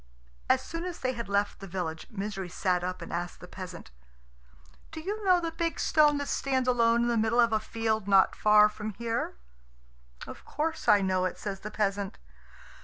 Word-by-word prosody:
As 260 0 +3
soon 330 +4 -5
as 360 -2 -5
they 255 0 -1
had 235 -4 -6
left 200 0 0
the 195 - -8
village, 170 -3 -4
Misery 195 -4 -5
sat 180 0 0
up 180 -1 -4
and - - -8
asked 175 +1 -4
the 180 - -11
peasant, 180 - -9 1.0
"Do - - -7
you 410 +6 -4
know 365 -2 +5
the 335 -1 -3
big 330 0 -2
stone 300 -2 +4
that 285 0 -3
stands 260 -2 0
alone 235 -1 +3
in - - +1
the 235 -1 +1
middle 225 +2 +2
of 235 -1 +4
a 215 - +3
field 220 -1 -2
not 195 -1 +5
far 210 0 +6
from 210 0 -6
here?" 230 - -2 0.9
"Of - - -10
course 320 +2 -3
I 205 -1 +6
know 185 -1 +1
it," 185 - -3
says 195 -2 -5
the 210 - -6
peasant. 200 -2 -2
215 Hz, 195 wpm, -29 LUFS, 195-260 Hz, 1.0 s, far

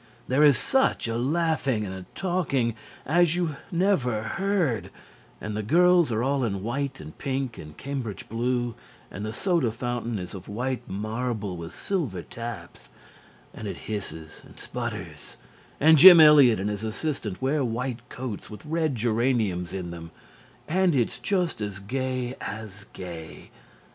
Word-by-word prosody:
There 135 +4 +3
is 145 -5 +7
such 265 - +1
a 115 - -2
laughing 135 -3 0
and 95 - -5
a 95 -1 -8
talking 160 -11 0 0.3
as 170 +2 +3
you 170 -5 -1
never 165 - +1
heard, 155 - 0 0.5
and 105 - -5
the 110 - -1
girls 175 - +4
are 110 +1 0
all 135 0 +1
in 100 -4 -2
white 135 +4 -2
and 75 +1 -10
pink 135 -3 -2
and 75 0 -10
cambridge 130 -7 -5
blue, 120 +1 -1 0.4
and 100 - -6
the 110 - -3
soda 165 - +1
fountain 120 -1 -3
is 90 -2 -6
of 95 - -9
white 125 +5 -3
marble 110 -1 -3
with 85 0 -8
silver 135 - -2
taps, 115 -1 -8 0.6
and 110 - -7
it 100 - -5
hisses 90 -7 -7
and - - -17
sputters, 105 - -6 0.4
and 160 +1 +6
Jim 175 0 +11
Eliot 145 -8 +8
and 100 +2 -1
his 105 +1 -5
assistant 110 -3 -3
wear 140 +2 +1
white 125 +1 -2
coats 125 -5 -6
with 105 +7 -10
red 160 -2 0
geraniums 110 -6 0
in 90 -2 -5
them, 85 -1 -8 0.6
and 180 -1 +2
it's 120 -4 0
just 180 - -1
as 100 -1 -3
gay 130 +4 -3
as 100 -2 -7
gay. 85 -3 -9
120 Hz, 155 wpm, -26 LUFS, 105-145 Hz, 0.6 s, Jim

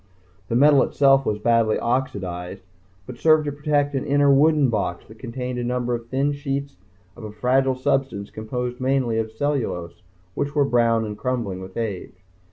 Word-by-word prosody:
The 115 - -2
metal 140 +2 +6
itself 135 -1 +3
was 105 - 0
badly 115 0 +2
oxidized, 95 -7 -3 0.4
but 125 - -10
served 155 -1 +4
to 145 - -2
protect 145 0 0
an 135 - -1
inner 140 0 +3
wooden 150 -1 +4
box 100 -5 -2
that 110 +1 -16
contained 125 0 -5
a - - -2
number 125 0 -1
of 115 -1 -4
thin 135 +4 0
sheets 140 0 -4 0.4
of 120 - -12
a 105 - -6
fragile 130 +5 +1
substance 130 -5 -1
composed 125 +3 -4
mainly 130 -4 +1
of 110 -1 -3
cellulose 110 - -3 0.3
which 145 +7 -3
were 145 -1 +3
brown 115 -3 +2
and 105 -1 -7
crumbling 115 -7 -2
with 95 0 -10
age. 105 -6 -4
125 Hz, 175 wpm, -23 LUFS, 110-140 Hz, 0.4 s, metal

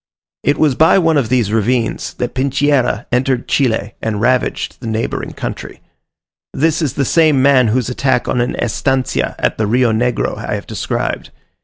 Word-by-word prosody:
It 145 - +1
was 150 -3 +3
by 160 +8 +4
one 165 -4 +2
of 135 -6 +1
these 120 -5 +1
ravines, 115 +2 -1
that 125 - -3
Pincheira 135 -4 +1
entered 125 0 0
Chile 110 -6 0
and 110 -2 -2
ravaged 125 +3 0
the 120 - -6
neighbouring 110 +1 -3
country. - - -6 0.7
This 160 +3 +1
is 145 -6 -1
the 140 - -1
same 155 -1 +3
man 130 -2 +4
whose 120 +2 0
attack 125 0 0
on 125 - 0
an 120 - -1
estancia 130 +3 -1
at - - -1
the 110 - +1
Rio 120 +2 +2
Negro 120 +2 -1
I - - -3
have - - -6
described. - - -3
125 Hz, 170 wpm, -16 LUFS, 115-140 Hz, 0.7 s, by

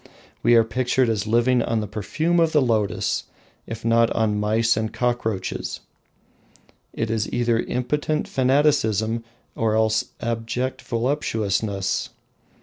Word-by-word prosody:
We 120 - +5
are 115 - +6
pictured 125 +2 +1
as 105 -2 -1
living 120 +2 +3
on 115 -1 0
the 105 - -2
perfume 155 - -1
of 165 -1 +2
the 150 - +5
lotus, 110 -5 0 0.4
if 115 +1 -7
not 115 0 +4
on 105 -2 +1
mice 110 +2 +2
and 110 0 -2
cockroaches. 115 -6 -2 1.1
It 110 -1 -2
is 110 -3 -1
either 120 -2 +1
impotent 150 +6 -1
fanaticism 125 -5 +2 0.3
or 110 -1 +1
else 110 0 +2
abject 115 +2 -3
voluptuousness. 110 -6 -1
115 Hz, 125 wpm, -23 LUFS, 110-125 Hz, 1.1 s, are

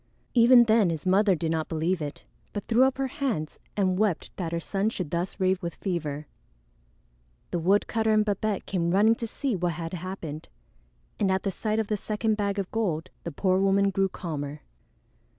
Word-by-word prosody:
Even 240 0 +7
then 220 -4 +4
his 160 0 -3
mother 195 +1 +4
did 165 -1 -2
not 160 -1 -1
believe 165 +2 0
it, 145 -1 -5 0.3
but 205 - -4
threw 240 +3 +5
up 265 0 0
her 270 - 0
hands 245 - -3 0.2
and 185 -2 +1
wept 210 -6 0
that 170 -3 -3
her 170 - -1
son 195 +5 -1
should 180 -8 -5
thus 175 +4 -2
rave 185 0 +2
with 170 -2 -4
fever. 155 -6 -3 1.3
The 175 - 0
woodcutter 205 +5 +2
and 215 0 +4
Babette 205 -1 -1
came 170 -3 -1
running 205 +5 +5
to 230 0 -4
see 255 +1 -2
what 175 -1 -1
had 165 +1 -5
happened, 170 -4 -6 0.7
and 195 -2 +2
at 190 0 0
the 195 - 0
sight 215 +3 -2
of 220 - +1
the 210 +1 -1
second 215 +2 -1
bag 200 -1 -1
of 195 -2 -3
gold 185 -6 -1
the 170 - -4
poor 185 +4 +1
woman 195 0 +3
grew 195 0 +1
calmer. 150 -5 -5
190 Hz, 190 wpm, -27 LUFS, 170-215 Hz, 1.3 s, Even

